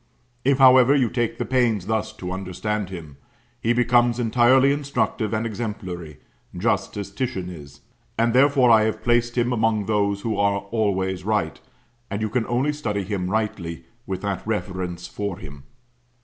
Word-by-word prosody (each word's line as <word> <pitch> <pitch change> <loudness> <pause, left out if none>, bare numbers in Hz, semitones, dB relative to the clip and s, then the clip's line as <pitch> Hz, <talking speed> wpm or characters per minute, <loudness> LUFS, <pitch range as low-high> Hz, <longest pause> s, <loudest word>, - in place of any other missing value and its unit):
If, 135 0 +3
however, 130 0 +7
you 130 -5 +2
take 120 -2 -1
the - - -2
pains 120 -7 +1
thus 110 0 -1
to 90 0 -6
understand 95 +2 -3
him, 80 -7 -9 0.4
he 115 - +1
becomes 120 0 +3
entirely 125 +4 +4
instructive 140 -6 -1
and 110 +1 -1
exemplary, 95 - -5 0.4
just - - 0
as 100 -1 -5
Titian 100 -5 -3
is; 70 -4 -12 0.4
and 115 0 +2
therefore 135 -1 +5
I 110 -1 +6
have 110 - -2
placed 120 0 +1
him 120 +1 +2
among 110 -3 +1
those 100 -1 0
are 100 -2 +1
"always 95 -4 0
right," 100 -7 -1 0.5
and 100 - -3
you 110 0 -1
can 120 -1 0
only 130 +5 +1
study 105 -9 -2
him 95 -2 -3
rightly 95 -6 -2 0.2
with 95 0 -4
that 100 -2 -2
reverence 95 -5 -3
for 100 -4 -4
him. 70 -6 -11
110 Hz, 160 wpm, -23 LUFS, 95-120 Hz, 0.5 s, however